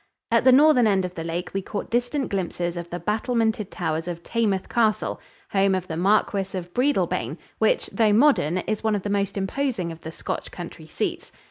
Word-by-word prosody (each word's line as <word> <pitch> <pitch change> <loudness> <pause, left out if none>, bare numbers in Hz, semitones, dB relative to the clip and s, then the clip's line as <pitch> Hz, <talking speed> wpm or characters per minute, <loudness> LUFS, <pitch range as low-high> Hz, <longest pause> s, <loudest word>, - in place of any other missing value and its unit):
At 230 +1 +3
the 260 - +8
northern 265 -3 +6
end 195 -3 +2
of 180 - -6
the 165 - -5
lake 170 +2 -3
we 195 - -1
caught 205 +1 -5
distant 245 +4 0
glimpses 175 -2 -2
of 170 0 -6
the 175 - -4
battlemented 220 -1 0
towers 165 -2 -2
of 170 -1 -5
Taymouth 210 -4 0
Castle, 215 -2 +1 0.3
home 195 -1 +3
of 185 -1 -3
the 160 - -4
Marquis 195 +1 +1
of 175 -1 -7
Breadalbane, 280 +4 0 0.2
which, - - +2
though 220 -3 +3
modern, 210 - +4
is 210 +4 -2
one 220 -1 +2
of 200 - -3
the 205 - -2
most 200 0 0
imposing 195 -3 -1
of 165 - -9
the 160 -1 -7
Scotch - - -5
country 170 -2 -9
seats. - - -3
200 Hz, 200 wpm, -24 LUFS, 175-225 Hz, 0.3 s, the